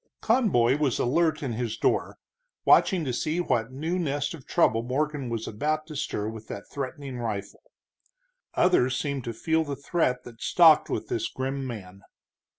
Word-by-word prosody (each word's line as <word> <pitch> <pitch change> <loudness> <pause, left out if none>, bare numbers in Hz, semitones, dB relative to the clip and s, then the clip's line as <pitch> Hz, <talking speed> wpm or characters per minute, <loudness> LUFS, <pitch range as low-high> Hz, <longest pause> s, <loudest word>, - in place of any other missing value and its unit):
Conboy 180 - +3
was 140 -5 +1
alert 160 +5 +1
in 130 -4 -2
his 115 -1 -3
door, - - 0 0.5
watching 180 -5 +5
to 130 - -2
see 155 +7 -1
what 120 -8 0
new 160 +7 -2
nest 145 -2 -1
of 150 -6 -11
trouble 115 - +3
Morgan 140 +2 -2
was 115 -1 -3
about 155 +8 -1
to 155 -1 -9
stir 105 -6 -2
with 110 0 -7
that 100 - -7
threatening 135 -1 -5
rifle. 105 -4 -4 0.9
Others 130 -8 +3
seemed 140 -3 -2
to 120 - -2
feel 160 +8 0
the 145 -2 -4
threat 140 -3 0
that 120 -1 -13
stalked 165 -3 +5
with - - -3
this 355 -2 -1
grim 135 - -3
man. 100 -5 -8
135 Hz, 165 wpm, -27 LUFS, 120-155 Hz, 0.9 s, watching